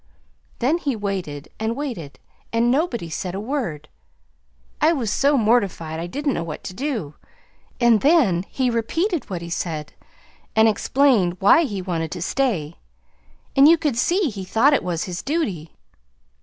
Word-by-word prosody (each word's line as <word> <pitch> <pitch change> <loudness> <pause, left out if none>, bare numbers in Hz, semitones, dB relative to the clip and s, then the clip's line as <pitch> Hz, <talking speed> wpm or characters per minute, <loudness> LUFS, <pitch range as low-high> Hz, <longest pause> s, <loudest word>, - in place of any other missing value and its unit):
Then 280 +8 +1
he 280 -6 -1
waited 185 -8 -4
and 220 +1 -1
waited, 235 - -5 0.3
and 230 +1 +2
nobody 260 - 0
said 180 +3 -4
a - - -3
word. 220 - -3 0.9
I 320 +2 +5
was 240 -9 -2
so 280 +5 +3
mortified 200 -9 +1
I 170 - -4
didn't 280 - -2
know - - -2
what 160 -2 -7
to - - -6
do. 225 - -3 0.7
And 235 -3 +4
then 265 - +3
he 255 -2 0
repeated 325 - -1
what 175 -3 -4
he 170 - -7
said, 155 -3 -4 0.6
an 220 0 +6
explained 220 -4 +2
why 205 +12 +5
he 200 -8 -4
wanted 165 -3 -2
to 175 - -6
stay, 185 - -1 0.8
and 275 +1 +7
you 335 +2 +7
could 300 -6 -1
see 345 - +1
he 195 -2 -6
thought 225 +10 +3
it 280 - +3
was 175 -2 -2
his 180 -3 -5
duty. 205 - -3
220 Hz, 160 wpm, -22 LUFS, 175-275 Hz, 0.9 s, and